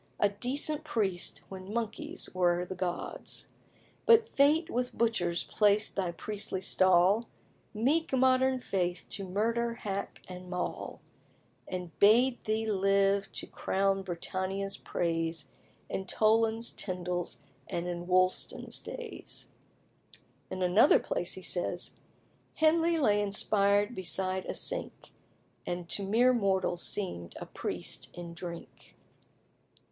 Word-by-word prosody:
A 205 - +4
decent 275 +8 -1
priest 205 - 0
when 190 0 -8
monkeys 235 - -3
were 175 -1 +2
the 185 - -5
gods. 180 -1 -4 0.6
But 460 -1 +7
Fate 300 -2 +3
with 245 +1 -2
butchers 175 -7 +1
placed 210 0 +2
thy 185 -3 0
priestly 205 +2 -4
stall, 185 +4 +4 0.4
Meek 275 +10 +1
modern 260 0 +3
faith 180 -5 -1
to 200 - -5
murder, 230 +4 0
hack, 200 -3 -5
and 180 0 -9
maul, 180 -1 -4 0.7
And 180 -2 -5
bade 240 +5 +5
thee 220 0 0
live 195 -1 +2
to - - -4
crown 195 0 0
Britannia's 190 +2 -3
praise 165 -3 -2 0.4
In 190 - -4
Toland's, 225 +3 +2
Tindal's, 180 -4 -3 0.2
and 170 +1 -3
in 175 0 -4
Woolston's 185 0 +1
days." 480 -3 -7 1.0
In 185 0 -3
another 185 +10 +6
place - - -2
he - - -9
says - - -1 0.6
"Henley 330 +1 +3
lay 210 -9 +3
inspired 205 +1 +2
beside 185 0 0
a - - -3
sink, - - -2 0.6
And 175 -1 -3
to - - 0
mere 230 +6 +4
mortals 190 -5 +1
seemed 85 - -3
a - - -6
priest - - -3
in 170 -1 -7
drink." 170 0 -9
200 Hz, 120 wpm, -31 LUFS, 180-235 Hz, 1.0 s, But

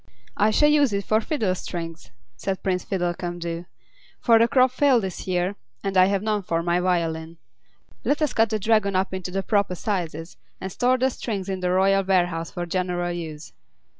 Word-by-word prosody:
"I 210 +1 +3
shall 295 +8 +4
use 290 -6 +4
it 200 0 -1
for 215 +1 +2
fiddle 220 -8 0
strings," 165 -2 -6 0.3
said 190 +6 -4
Prince 185 -2 0
Fiddlecumdoo, 175 -2 -3 0.5
"for 230 -2 +5
the 230 - +5
crop 255 0 +4
failed 255 -3 +3
this 190 -1 -5
year, 180 +1 0 0.3
and 195 -1 -2
I 185 0 +7
have 200 +1 0
none 215 -1 0
for 165 -3 -1
my 175 +1 +1
violin. 165 -2 -1 0.7
Let 290 - +1
us 300 - 0
cut 225 -1 +3
the 215 - 0
Dragon 215 -2 +2
up 190 +1 0
into 185 -1 -4
the 195 +1 -2
proper 200 -3 +1
sizes, 170 -4 -3 0.2
and 190 - -5
store 250 +6 +2
the 260 +1 +1
strings 200 -6 -4
in 190 -1 -2
the 180 -1 -1
royal 195 +2 +3
warehouse 175 -3 +1
for 175 -2 -4
general 175 0 -1
use." 160 -3 -7
190 Hz, 190 wpm, -24 LUFS, 175-215 Hz, 0.7 s, I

